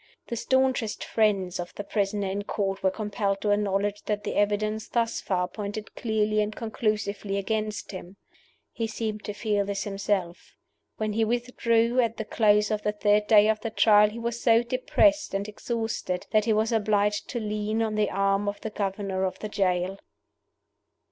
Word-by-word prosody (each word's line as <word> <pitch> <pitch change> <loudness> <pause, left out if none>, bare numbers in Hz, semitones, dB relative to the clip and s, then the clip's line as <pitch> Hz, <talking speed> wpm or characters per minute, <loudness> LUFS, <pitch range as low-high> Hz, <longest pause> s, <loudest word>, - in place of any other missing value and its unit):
The 235 - -2
staunchest 260 -2 +1
friends 195 -5 +1
of 175 0 -6
the 205 - -5
prisoner 200 0 -1
in 200 +2 -2
Court 195 -2 -2
were 190 - +3
compelled 200 -1 -2
to 210 - +1
acknowledge 205 0 0
that 210 -1 -2
the - - -3
evidence 210 +1 0
thus 230 -1 0
far 180 -2 0
pointed 205 +3 -6
clearly 215 -2 0
and 210 0 -2
conclusively 210 -3 -2
against 215 +1 -2
him. 185 0 -9 0.5
He 230 -1 -2
seemed 215 -1 -4
to 210 - -4
feel 205 -1 0
this 200 0 -3
himself. 195 -3 -3 0.4
When 215 -1 -1
he 225 +1 +2
withdrew 235 0 +1
at 230 -2 +1
the 220 - -4
close 210 -1 +3
of 210 -1 0
the 210 - -1
third 210 0 +2
day 210 -1 +6
of 215 0 +2
the 225 - -3
Trial 210 -1 +5
he 215 - -9
was 235 0 -3
so 230 -1 +5
depressed 295 +2 +2
and 200 +1 -2
exhausted 225 -4 -3
that 215 -1 +3
he 225 - +3
was 220 +2 +1
obliged 210 -2 +1
to 240 - -2
lean 215 +1 -1
on 220 -1 -1
the 210 -1 +1
arm 195 +1 +1
of 205 - -6
the 220 - -4
governor 195 -2 -2
of 185 - -1
the 215 - -6
jail. 190 -1 0
210 Hz, 180 wpm, -26 LUFS, 200-220 Hz, 0.5 s, day